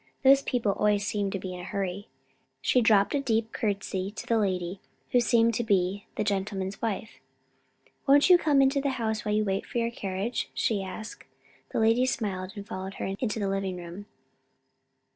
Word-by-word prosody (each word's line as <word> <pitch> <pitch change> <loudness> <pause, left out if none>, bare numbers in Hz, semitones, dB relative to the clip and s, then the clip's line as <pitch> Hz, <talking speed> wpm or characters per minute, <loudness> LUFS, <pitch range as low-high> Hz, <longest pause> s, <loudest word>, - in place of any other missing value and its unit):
"Those 270 +1 +7
people 240 -7 0
always 205 0 +1
seem 205 -1 -1
to 195 - -2
be 185 -1 -6
in 180 - -7
a - - -7
hurry." 195 +1 -3 0.5
She 250 - +3
dropped 210 -3 +4
a 285 - +2
deep 225 -4 0
curtsy 195 -2 -2
to 205 - -8
the 230 -1 +2
lady, 185 -2 -1 0.3
who 250 - +5
seemed 230 -1 +3
to 240 - 0
be 200 -2 0
the - - 0
gentleman's 195 -1 -2
wife. 220 -1 -3 0.9
"Won't 285 +1 +6
you 360 -1 +7
come 285 -4 +4
into 270 +1 +2
the 280 - 0
house 220 -2 -1
while 210 0 0
you 215 0 +2
wait 195 0 -1
for - - -6
the 230 0 0
carriage?" 200 +2 -3
she 210 -3 +1
asked. 190 +3 -7 0.4
The - - -2
lady 225 +3 +4
smiled, 195 -6 -2
and 200 -1 -7
followed 190 0 -6
her - - -4
into 225 -4 -1
the 200 - 0
living 195 -1 -2
room. 175 +4 -9
205 Hz, 190 wpm, -28 LUFS, 195-230 Hz, 0.9 s, Those